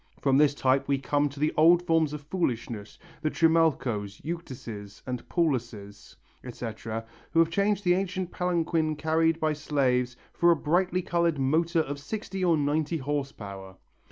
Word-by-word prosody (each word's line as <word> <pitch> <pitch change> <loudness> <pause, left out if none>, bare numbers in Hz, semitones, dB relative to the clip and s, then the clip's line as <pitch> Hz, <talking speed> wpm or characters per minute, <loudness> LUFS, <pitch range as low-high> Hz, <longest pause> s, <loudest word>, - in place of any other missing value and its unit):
From 135 -2 +2
this 145 -1 +4
type 135 0 +2
we 140 - +2
come 145 +2 0
to 140 +1 -11
the 150 +1 +1
old 170 +3 +6
forms 165 -3 +2
of 150 -1 -6
foolishness, 120 - -3 0.2
the 155 - +1
Trimalchos, 140 -12 +1
Euctuses 120 -11 -7
and 125 -1 -5
Paulluses, 115 - -2 0.3
etc., 115 -2 -6 0.3
who - - -1
have 165 0 +5
changed 200 +2 +1
the 175 -2 +4
ancient 185 -1 -2
palanquin 165 -3 0
carried 160 +1 +1
by 155 -1 +1
slaves 130 -5 0 0.2
for 170 - +3
a 170 - +6
brightly 180 +4 +1
coloured 170 -3 +1
motor 160 +5 +2
of 145 -2 -5
sixty 195 +3 -5
or 170 -3 +4
ninety 150 +3 0
horse 145 -1 -2
power. 95 -5 -9
150 Hz, 155 wpm, -27 LUFS, 125-170 Hz, 0.3 s, old